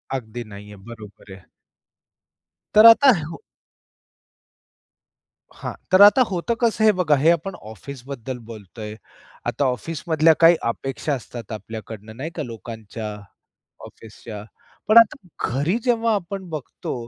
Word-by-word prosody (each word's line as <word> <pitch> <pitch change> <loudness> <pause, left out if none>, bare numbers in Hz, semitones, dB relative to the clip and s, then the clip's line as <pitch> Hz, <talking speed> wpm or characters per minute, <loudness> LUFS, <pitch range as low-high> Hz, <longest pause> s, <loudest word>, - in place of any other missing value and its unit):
अगदी 120 -1 -6
नाही 105 -1 -12
आहे. 95 -2 -14
बरोबर 105 -4 -12
आहे. 95 -1 -14 1.3
तर 215 +2 +8
आता 260 +4 +8
हो. 165 +2 -9 2.1
हां, - - -6 0.2
तर 185 +2 +6
आता 205 +6 +8
होतं 190 +6 -2
कसं 225 -2 +1
हे 215 - +7
बघा 170 -5 +2
हे 155 +5 +3
आपण 175 +3 -2
ऑफिसबद्दल 130 +3 -8
बोलतोय. 105 0 -9 0.5
आता 140 - -1
ऑफिसमधल्या 160 - +1
काही 170 +1 +7
अपेक्षा 135 +4 -3
असतात 120 -3 -9
आपल्याकडनं 110 0 -8
नाही 155 +5 -5
का? 155 - -3
लोकांच्या, 110 -2 -8 0.7
ऑफिसच्या. 105 -1 -11 0.4
पण 215 +2 +5
आता 230 -2 +6 0.3
घरी 145 - 0
जेव्हा 230 -2 +1
आपण 190 -1 -5
बघतो, 155 -4 -6
135 Hz, 125 wpm, -22 LUFS, 110-180 Hz, 2.1 s, तर